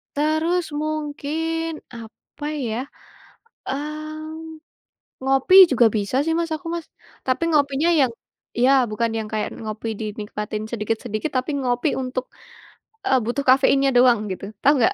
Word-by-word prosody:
Terus 315 +4 +1 0.2
mungkin 310 +2 -2 0.3
apa 230 +5 -11 0.2
ya, 220 -1 -2 0.9
mmm, 310 +2 -5 0.7
ngopi 270 +7 +3 0.2
juga 245 -3 +5
bisa 205 +4 -1
sih 325 +1 0
Mas, 335 -1 -1
aku 330 - -14
Mas, 340 -1 -5 0.4
tapi 255 +4 0
ngopinya 285 +1 +2
yang 260 -3 +3 0.5
iya 255 +3 +5 0.2
bukan 230 +2 0
yang 215 -1 -4
kayak 215 -1 -1
ngopi 215 +1 -5
dinikmatin 210 0 -4
sedikit-sedikit, 225 +3 -2
tapi 255 +4 0
ngopi 245 +2 0
untuk 255 0 -3 0.8
eee, 265 - +4
butuh 245 +5 -1
kafeinnya 275 +1 +5
doang 245 -2 +6
gitu, 185 - -5 0.2
tahu 285 - +6
enggak? 240 - +3
270 Hz, 130 wpm, -22 LUFS, 230-310 Hz, 0.9 s, doang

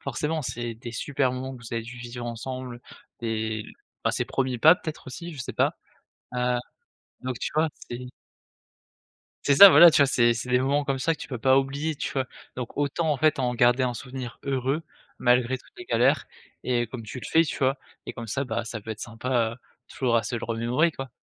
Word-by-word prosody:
forcément 150 +4 -2
c'est 120 -2 -4
des 120 +1 -8
super 130 +3 0
moments 130 +1 -5
que 120 - -14
vous 115 - -10
avez 115 -1 -1
dû 125 +2 -9
vivre 120 0 -6
ensemble, 125 +1 -6 0.4
des 110 -1 -2 0.4
bah - - +2
ses - - -1
premiers 130 -2 -1
pas 160 +8 +8
peut-être 155 -5 -7
aussi? 170 +7 -7
Je 150 - -11
sais - - -5
pas. - - +1 0.6
Heu, 125 0 +1 0.6
donc 125 -2 -4
tu - - -2
vois? 155 +1 +3 0.2
C'est 120 +1 -6 1.4
C'est 140 - +4
ça! 200 +8 +12
Voilà, 175 -2 +9
tu - - +3
vois? - - +4
C'est 120 -3 +4
c'est 120 +2 -5
des 125 - +4
moments 140 +3 +1
comme 135 -1 -1
ça 165 +5 +1
que - - -17
tu - - -7
peux 125 - -4
pas 130 +3 +5
oublier, 140 +4 -1
tu - - -4
vois? 135 -2 -1 0.3
Donc 125 -2 -6
autant, 145 +2 0
en - - -1
fait, 155 +1 +2
en 125 -2 0
garder 120 +2 +4
un 125 -1 -1
souvenir 125 0 -7
heureux, 135 +3 -1 0.4
malgré 125 +1 +3
toutes - - -20
les 360 - -9
galères - - +2 0.4
et 120 -1 +1
comme 120 0 -7
tu 125 +4 -7
le - - -7
fais, 165 - +6
tu 150 - -4
vois? 135 +1 +2 0.3
Et - - -4
comme 120 -2 -7
ça, 140 +6 -2
bah 115 -2 -2
ça 115 -1 -6
peut 110 - -8
être 110 - -6
sympa, 120 0 -1
heu, - - -10 0.3
toujours 125 -3 0
à 115 - +2
se 110 - -4
le 115 - -4
remémorer 120 +8 +1
quoi. 135 -3 -7
125 Hz, 225 wpm, -26 LUFS, 120-140 Hz, 1.4 s, ça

